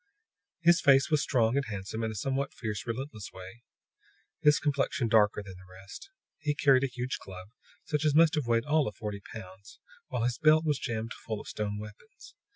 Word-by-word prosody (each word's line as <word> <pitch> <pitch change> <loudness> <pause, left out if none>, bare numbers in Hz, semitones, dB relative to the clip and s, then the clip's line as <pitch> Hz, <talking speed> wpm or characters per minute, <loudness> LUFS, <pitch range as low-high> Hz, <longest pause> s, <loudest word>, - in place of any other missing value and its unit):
His 170 +2 +5
face 135 0 +5
was 150 -2 +3
strong 120 -3 +2
and 140 0 +1
handsome 105 +1 -5
in 110 - -1
a 110 - -6
somewhat 135 +6 -2
fierce, 110 -1 -5
relentless 115 -3 -5
way; 95 +5 -11 0.8
his 150 0 +5
complexion 140 -4 0
darker 105 -2 +3
than 95 -1 -10
the 90 0 -17
rest. 100 - -11 0.3
He 150 -1 -1
carried 135 -2 +4
a - - +2
huge 125 +1 -4
club, 95 0 -10 0.4
such 150 -1 -1
as 150 -2 +2
must 165 0 +6
have 150 -6 -1
weighed 115 0 +2
all 150 0 +2
of 105 - -5
forty 105 -1 -5
pounds, 100 -2 -11 0.3
while 125 -2 -2
his 120 0 -1
belt 155 +1 +5
was 150 -3 +1
jammed 115 0 -3
full 110 -2 -6
of - - -11
stone 105 -1 -3
weapons. 105 0 -12
120 Hz, 195 wpm, -29 LUFS, 105-145 Hz, 0.8 s, must